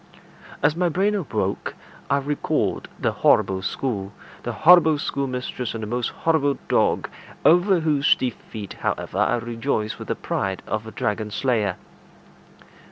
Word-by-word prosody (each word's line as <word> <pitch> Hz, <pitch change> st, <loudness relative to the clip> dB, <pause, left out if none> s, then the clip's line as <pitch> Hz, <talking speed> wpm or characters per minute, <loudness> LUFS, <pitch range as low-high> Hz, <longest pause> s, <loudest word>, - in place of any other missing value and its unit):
As 150 Hz, +1 st, +4 dB
my 175 Hz, 0 st, +1 dB
brain 195 Hz, +5 st, +1 dB
awoke, 195 Hz, -8 st, -2 dB, 0.3 s
I 140 Hz, -, +3 dB
recalled 145 Hz, +1 st, -1 dB
the -, -, 0 dB
horrible 95 Hz, -1 st, +3 dB
school, 100 Hz, -1 st, -3 dB, 0.3 s
the 120 Hz, -, -3 dB
horrible 160 Hz, +6 st, +6 dB
schoolmistress, 125 Hz, -4 st, -3 dB
and 110 Hz, -, -4 dB
the -, -, -4 dB
most 120 Hz, +2 st, -1 dB
horrible 150 Hz, -4 st, +1 dB
dog, -, -, +2 dB, 0.4 s
over 180 Hz, +1 st, +5 dB
whose 150 Hz, -3 st, +3 dB
defeat, 110 Hz, -4 st, -5 dB
however, -, -, -2 dB
I 120 Hz, -, +3 dB
rejoiced 115 Hz, -1 st, -2 dB
with -, -, -8 dB
the -, -, -1 dB
pride 95 Hz, -1 st, -3 dB
of 110 Hz, +1 st, -3 dB
a -, -, -7 dB
dragon 105 Hz, +1 st, -2 dB
slayer. 105 Hz, -4 st, 0 dB
125 Hz, 140 wpm, -23 LUFS, 110-155 Hz, 0.4 s, horrible